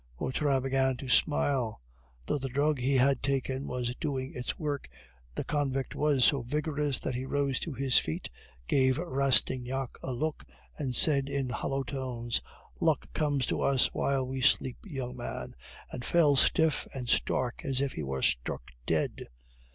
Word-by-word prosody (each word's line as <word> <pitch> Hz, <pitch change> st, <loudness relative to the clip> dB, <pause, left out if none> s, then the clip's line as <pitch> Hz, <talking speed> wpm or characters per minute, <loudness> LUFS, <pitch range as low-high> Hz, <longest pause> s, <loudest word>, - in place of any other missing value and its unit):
Vautrin 135 Hz, -, 0 dB
began 135 Hz, -1 st, +1 dB
to 135 Hz, -, -7 dB
smile. 130 Hz, -, +2 dB, 0.5 s
Though 145 Hz, -, 0 dB
the 135 Hz, 0 st, -3 dB
drug 145 Hz, +2 st, +1 dB
he 135 Hz, +3 st, +1 dB
had 135 Hz, 0 st, +3 dB
taken 135 Hz, 0 st, -1 dB
was 125 Hz, -1 st, -2 dB
doing 135 Hz, -4 st, -3 dB
its 125 Hz, 0 st, -4 dB
work, 145 Hz, -, -3 dB, 0.5 s
the -, -, -2 dB
convict 135 Hz, -3 st, -1 dB
was 145 Hz, -3 st, +3 dB
so 140 Hz, -3 st, +4 dB
vigorous 145 Hz, +1 st, -1 dB
that 130 Hz, -, -2 dB
he 125 Hz, +1 st, -3 dB
rose 140 Hz, -2 st, 0 dB
to 165 Hz, -, -4 dB
his 130 Hz, 0 st, +4 dB
feet, 80 Hz, -, -4 dB, 0.4 s
gave 130 Hz, -1 st, +3 dB
Rastignac 135 Hz, -4 st, +1 dB
a 130 Hz, -, -4 dB
look, 150 Hz, +5 st, -2 dB, 0.3 s
and 130 Hz, -4 st, -3 dB
said 140 Hz, -1 st, +4 dB
in 140 Hz, -2 st, -1 dB
hollow 135 Hz, +2 st, -2 dB
tones, 125 Hz, -3 st, -2 dB, 0.4 s
"Luck -, -, +1 dB
comes 145 Hz, -3 st, +1 dB
to -, -, -1 dB
us 135 Hz, -2 st, +3 dB
while 135 Hz, -1 st, +1 dB
we 130 Hz, 0 st, -3 dB
sleep, 130 Hz, -1 st, +3 dB
young 130 Hz, -9 st, -5 dB
man," 120 Hz, -, -5 dB, 0.4 s
and 125 Hz, -, -6 dB
fell 150 Hz, 0 st, +4 dB
stiff 160 Hz, +2 st, +3 dB
and 125 Hz, -2 st, -4 dB
stark, 125 Hz, +1 st, 0 dB
as 135 Hz, -4 st, +1 dB
if 140 Hz, -1 st, 0 dB
he -, -, -4 dB
were 65 Hz, -2 st, -3 dB
struck -, -, -1 dB, 0.2 s
dead. -, -, -1 dB
135 Hz, 165 wpm, -30 LUFS, 125-140 Hz, 0.5 s, so